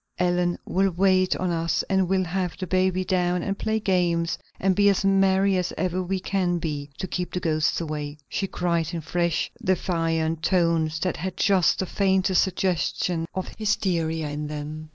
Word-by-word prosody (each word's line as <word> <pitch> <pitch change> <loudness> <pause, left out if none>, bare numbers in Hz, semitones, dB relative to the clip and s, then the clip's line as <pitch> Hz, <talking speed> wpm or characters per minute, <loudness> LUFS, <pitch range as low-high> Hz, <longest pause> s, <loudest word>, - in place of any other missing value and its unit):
"Ellen 175 -1 +1
will 195 +1 +2
wait 185 +1 +2
on 185 -1 -1
us 165 -2 0
and 190 -2 +1
we'll 190 -1 +2
have 180 0 -2
the 190 - -4
baby 185 +1 +1
down 180 -1 +1
and 195 - -1
play 220 +2 -1
games 175 -4 +1 0.2
and 190 -1 +2
be 205 +1 +5
as 195 0 +1
merry 195 0 +3
as 180 -1 -1
ever 185 0 -1
we 185 +1 -2
can 185 -2 0
be, 150 -3 -4
to - - -3
keep 180 -1 -3
the 180 - -1
ghosts 155 -2 +1
away," 150 -2 -4
she 195 - -2
cried 170 -3 -1
in 165 - -3
fresh, 170 +1 -1
defiant 165 -3 0
tones 165 -3 +1
that 185 - -1
had 185 +3 -4
just 190 -5 +3
the 190 - -1
faintest 190 -1 +2
suggestion 175 -2 -1
of 185 - -3
hysteria 170 -7 0
in 150 +1 -4
them. 150 +1 -6
180 Hz, 175 wpm, -25 LUFS, 165-190 Hz, 0.2 s, be